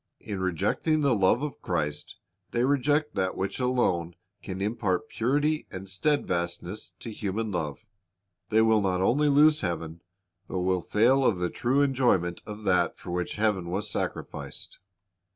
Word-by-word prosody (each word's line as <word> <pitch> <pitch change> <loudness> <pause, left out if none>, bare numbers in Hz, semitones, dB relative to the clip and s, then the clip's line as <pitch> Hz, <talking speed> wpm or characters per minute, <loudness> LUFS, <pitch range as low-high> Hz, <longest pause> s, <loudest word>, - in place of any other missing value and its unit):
In 100 -3 -5
rejecting 100 - 0
the 140 -3 +3
love 105 +5 +3
of 150 - -5
Christ 75 -4 -2 0.3
they 120 - 0
reject 145 +2 +2
that 95 -1 -1
which 95 +4 -3
alone 95 -10 +1 0.3
can 95 0 -6
impart 105 -1 -1
purity 145 +6 0
and 95 0 -7
steadfastness 95 - -2
to 115 - -6
human 105 +1 -3
love. 85 +2 -4 0.6
They 110 0 +4
will 110 -1 +4
not 95 -2 0
only 145 +9 +3
lose 150 +2 +5
heaven, 85 -2 -3 0.5
but 95 - -2
will 90 0 +1
fail 125 +9 +3
of 115 -7 +3
the 90 -1 -1
true 130 +4 +2
enjoy 130 -5 +3
ment 85 0 -5
of 105 0 -7
that 95 -3 +2
for - - -8
which 90 0 -2
heaven 105 -5 0
was 100 +4 -2
sacrificed. - - -5
105 Hz, 155 wpm, -27 LUFS, 90-125 Hz, 0.6 s, lose